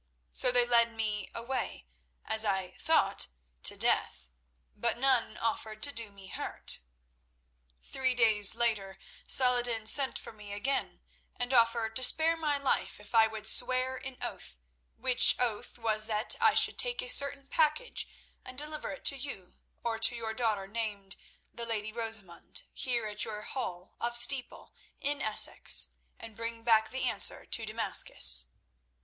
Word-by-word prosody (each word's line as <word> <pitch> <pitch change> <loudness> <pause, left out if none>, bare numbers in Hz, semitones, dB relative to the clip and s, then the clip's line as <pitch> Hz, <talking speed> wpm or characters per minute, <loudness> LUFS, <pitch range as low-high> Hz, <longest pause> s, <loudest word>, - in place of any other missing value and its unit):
So 250 - +3
they 245 -1 +3
led 235 -1 +3
me 210 -3 -4
away, 235 - -5 0.4
as 220 0 +3
I 190 -3 -2
thought, - - +2 0.3
to - - +1
death, 60 - 0 0.4
but - - -1
none 260 -2 0
offered 225 -4 -4
to 285 - +2
do 230 -5 -4
me 200 -1 -15
hurt. - - -4 1.0
"Three 255 -1 +1
days 220 -3 +4
later 215 -5 -1 0.3
Saladin 245 -3 +3
sent 265 +4 +5
for - - -9
me 210 -2 -11
again, 265 +7 -4 0.3
and 245 +1 -4
offered 230 -2 +1
to - - +1
spare 320 +5 +5
my 305 -3 -2
life 280 -6 -2
if 210 +2 -13
I 225 -1 +5
would 220 -1 -9
swear 255 +2 +3
an 260 0 -10
oath, - - -8 0.4
which 255 0 +5
oath 235 -3 -3
was 215 -2 -1
that 215 0 0
I - - +3
should - - +5
take - - +2
a - - -7
certain 280 - +2
package 315 - -1 0.3
and 255 - -12
deliver 300 +1 -3
it 285 - -10
to 275 - +6
you, 245 -9 -7 0.3
or 230 -1 -3
to 225 +2 +4
your 225 -1 -4
daughter 220 -4 -2
named 200 -2 -5 0.4
the 235 0 -7
Lady 215 -1 -4
Rosamund 225 -6 -7
here 240 -4 -2
at 210 0 -1
your 210 -1 -5
hall 180 -9 -7
of 240 0 0
Steeple, 250 +2 0 0.3
in 285 +1 -1
Essex, 215 -1 +6 0.3
and 225 -2 -12
bring 230 0 -6
back 220 -1 +2
the 260 - -5
answer - - 0
to 225 -1 -4
Damascus. 215 - 0
230 Hz, 155 wpm, -29 LUFS, 215-255 Hz, 1.0 s, to